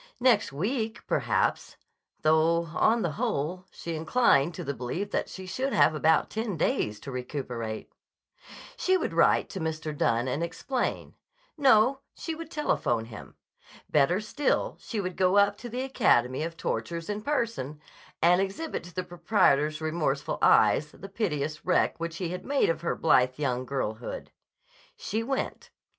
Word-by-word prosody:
Next 235 Hz, -, +3 dB
week, 220 Hz, -, -2 dB
perhaps—'though, 160 Hz, +2 st, 0 dB
on 225 Hz, +6 st, +3 dB
the 170 Hz, -, 0 dB
whole, 180 Hz, +6 st, -2 dB
she 170 Hz, -, -6 dB
inclined 160 Hz, -, +3 dB
to -, -, -5 dB
the 140 Hz, -, -3 dB
belief 165 Hz, +12 st, -4 dB
that -, -, -1 dB
she 190 Hz, -, -8 dB
should 260 Hz, +9 st, -2 dB
have 145 Hz, +2 st, +5 dB
about 155 Hz, +1 st, +2 dB
ten 220 Hz, -5 st, -3 dB
days 105 Hz, -8 st, 0 dB
to 135 Hz, -, -7 dB
recuperate. 125 Hz, -4 st, -5 dB, 0.8 s
She 375 Hz, -5 st, +2 dB
would -, -, -3 dB
write -, -, +4 dB
to 190 Hz, -, -6 dB
Mr. 155 Hz, -2 st, -3 dB
Dunne 120 Hz, -2 st, +1 dB
and 140 Hz, +5 st, -1 dB
explain. 245 Hz, +9 st, -3 dB, 0.4 s
No; 265 Hz, -2 st, +4 dB, 0.2 s
she 330 Hz, -, -4 dB
would 325 Hz, 0 st, -8 dB
telephone 120 Hz, -, 0 dB
him. 115 Hz, -2 st, -11 dB, 0.6 s
Better 155 Hz, +6 st, +3 dB
still, 275 Hz, +7 st, 0 dB
she 225 Hz, -, -4 dB
would 185 Hz, -2 st, -3 dB
go 185 Hz, +1 st, +3 dB
up 200 Hz, 0 st, +4 dB
to 240 Hz, -, -8 dB
the 250 Hz, +3 st, -3 dB
Academy 130 Hz, -, +2 dB
of 165 Hz, +1 st, -4 dB
Tortures 170 Hz, 0 st, -3 dB
in 210 Hz, 0 st, -3 dB
person 230 Hz, -, -2 dB, 0.4 s
and 175 Hz, +2 st, +5 dB
exhibit 195 Hz, +12 st, -3 dB
to 175 Hz, -, -13 dB
the 185 Hz, -, -1 dB
proprietor's 155 Hz, -5 st, +2 dB
remorseful 155 Hz, -3 st, -1 dB
eyes 150 Hz, -, +5 dB
the 195 Hz, -, -10 dB
piteous 155 Hz, -8 st, -2 dB
wreck 180 Hz, -, +1 dB
which 165 Hz, 0 st, -4 dB
he 180 Hz, -2 st, -3 dB
had 180 Hz, +1 st, -5 dB
made 275 Hz, -8 st, +2 dB
of 165 Hz, -, -5 dB
her 170 Hz, -, -1 dB
blithe 130 Hz, -5 st, +3 dB
young 130 Hz, -3 st, -1 dB
girlhood. 120 Hz, -4 st, -4 dB, 0.7 s
She 220 Hz, +2 st, -2 dB
went. 265 Hz, +4 st, -3 dB
170 Hz, 155 wpm, -28 LUFS, 145-215 Hz, 0.8 s, have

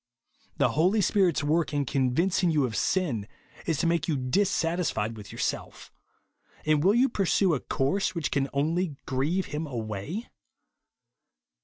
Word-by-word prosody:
The -, -, +3 dB
Holy 185 Hz, +7 st, +2 dB
Spirit's 190 Hz, -5 st, +2 dB
work 155 Hz, +1 st, +1 dB
in 145 Hz, -1 st, +1 dB
convincing 165 Hz, +9 st, +1 dB
you 150 Hz, -4 st, +2 dB
of 115 Hz, -3 st, -4 dB
sin, 120 Hz, -, 0 dB, 0.4 s
is 160 Hz, -, +1 dB
to -, -, 0 dB
make 165 Hz, -2 st, +1 dB
you 155 Hz, -4 st, +1 dB
dissatisfied 165 Hz, -, 0 dB
with 105 Hz, -2 st, -10 dB
your -, -, -10 dB
self; -, -, -4 dB, 0.7 s
and 155 Hz, -1 st, +3 dB
vv^ill 195 Hz, +7 st, +4 dB
you 260 Hz, +2 st, +5 dB
pursue 195 Hz, -5 st, +2 dB
a 140 Hz, -, 0 dB
course 165 Hz, +12 st, -1 dB
which 165 Hz, -4 st, -2 dB
can 140 Hz, -1 st, 0 dB
only 160 Hz, +3 st, 0 dB
grieve 150 Hz, +9 st, 0 dB
him 155 Hz, +2 st, -2 dB
away? 115 Hz, -, -5 dB
155 Hz, 150 wpm, -27 LUFS, 135-185 Hz, 0.7 s, you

